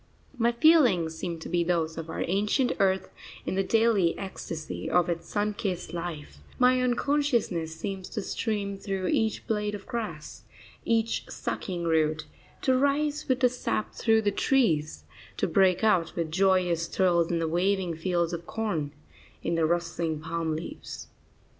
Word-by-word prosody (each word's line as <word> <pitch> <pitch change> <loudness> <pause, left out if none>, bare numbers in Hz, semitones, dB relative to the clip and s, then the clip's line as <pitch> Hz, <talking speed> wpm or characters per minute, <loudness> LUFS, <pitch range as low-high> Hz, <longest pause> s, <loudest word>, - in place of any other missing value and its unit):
My 235 -1 +2
feelings 235 - +4
seem 170 0 -4
to - - -6
be 175 0 +1
those 165 -2 0
of 165 0 -6
our - - -2
ancient 210 +8 +1
earth 190 -1 +1 0.3
in - - -2
the 195 - +2
daily 215 -4 +3
ecstasy 165 -4 -5
of 175 0 +3
its 170 -1 -3
sun 210 0 0
kissed 185 -4 -4
life; 170 -4 -6 0.2
my 255 0 +4
own 250 -1 +2
consciousness 235 - 0
seems 190 +2 -5
to 215 - -3
stream 200 -3 -2
through 195 -2 -2
each 220 -1 0
blade 210 -2 -1
of 205 - -9
grass, 210 -11 -5 0.4
each 230 0 0
sucking 175 -3 -4
root, 155 -1 +1 0.4
to 260 - +3
rise 290 +3 +1
with 260 -2 +1
the 250 - +6
sap 245 -3 -2
through 225 -1 +2
the 205 - +2
trees, 175 - +1 0.3
to - - +1
break 190 -1 +3
out 185 -7 +2
with 165 -2 -2
joyous 180 -2 +2
thrills 170 -3 +2
in 170 - 0
the 165 -1 0
waving 180 +1 +1
fields 170 0 0
of 170 0 -5
corn, 175 -10 -2 0.5
in - - -1
the 165 -1 +2
rustling 170 -2 -1
palm 160 0 -2
leaves. 170 - -7
185 Hz, 160 wpm, -28 LUFS, 165-225 Hz, 0.5 s, the